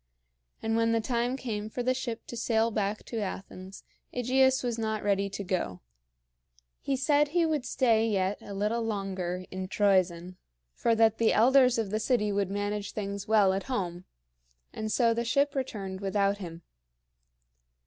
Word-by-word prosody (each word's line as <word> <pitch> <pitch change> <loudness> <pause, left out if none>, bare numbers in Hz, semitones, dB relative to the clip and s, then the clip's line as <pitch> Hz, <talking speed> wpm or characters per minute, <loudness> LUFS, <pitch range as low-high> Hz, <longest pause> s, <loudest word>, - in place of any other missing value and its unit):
And 225 0 0
when 230 0 +2
the 230 - +3
time 240 +2 -1
came 215 -5 -4
for 245 +3 -4
the 255 +1 +2
ship 240 -3 -5
to - - -8
sail 230 -1 +1
back 210 0 -2
to 230 - -4
Athens, 190 -1 -7 0.3
AEgeus 260 +2 +3
was 235 -2 -2
not 220 -1 -2
ready 200 -1 +1
to 200 - -5
go. 180 - -2 1.0
He 275 - -1
said 290 +2 +3
he 335 +3 +2
would 305 -5 -1
stay 225 -3 +2
yet 195 -1 0
a 200 - -8
little 210 +4 0
longer 190 -4 -3
in 185 0 -4
Troezen, 185 -3 +1 0.4
for 230 - +1
that 225 -1 +3
the 230 - +3
elders 255 +2 +5
of 220 -4 -2
the 215 - 0
city 215 -2 +1
would 200 -1 0
manage 205 +1 -3
things 200 0 -4
well 210 -3 +4
at 195 - -3
home; 180 -7 -3 0.7
and 215 0 -4
so 230 0 +3
the 235 +1 -1
ship 280 +4 +1
returned 200 -8 -4
without 200 0 +1
him. 170 -3 -8
215 Hz, 170 wpm, -29 LUFS, 195-235 Hz, 1.0 s, elders